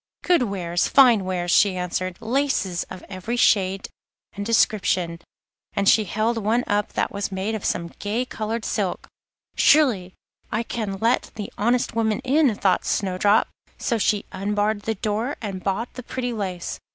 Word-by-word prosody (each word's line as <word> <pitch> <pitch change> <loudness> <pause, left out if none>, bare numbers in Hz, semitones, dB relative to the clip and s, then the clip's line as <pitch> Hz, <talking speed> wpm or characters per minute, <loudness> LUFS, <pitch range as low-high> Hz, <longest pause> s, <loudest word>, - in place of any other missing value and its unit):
'Good 355 -5 +3
wares, 180 -6 0
fine 240 -8 +5
wares,' 175 -2 -1
she 190 0 +4
answered; 180 0 -3
'laces 230 -8 0
of 185 - -9
every 190 +5 -4
shade 195 -4 +2 0.5
and 205 - -5
description,' 190 -6 +1 0.5
and 200 - 0
she 215 +1 +5
held 220 +4 0
one 225 +3 +1
up 205 0 -1
that - - 0
was 200 0 -3
made 190 +3 -2
of 220 - -4
some 170 -1 -1
gay 220 +5 -1
coloured 225 -1 -4
silk. 200 -5 -2 0.5
'Surely 225 -12 +3 0.4
I 220 +2 0
can 215 -4 -4
let 230 +4 +1
the 210 -2 -6
honest 235 +2 0
woman 220 -2 +1
in,' 270 -3 +3
thought 190 -2 +1
Snowdrop; 200 +2 +2 0.3
so 235 -3 -1
she 205 0 +1
unbarred 205 +1 -1
the 225 - 0
door 220 +7 -2
and 195 -4 -5
bought 200 +5 -2
the 255 - -7
pretty 245 0 -4
lace. 185 -5 -4
210 Hz, 160 wpm, -23 LUFS, 190-230 Hz, 0.5 s, fine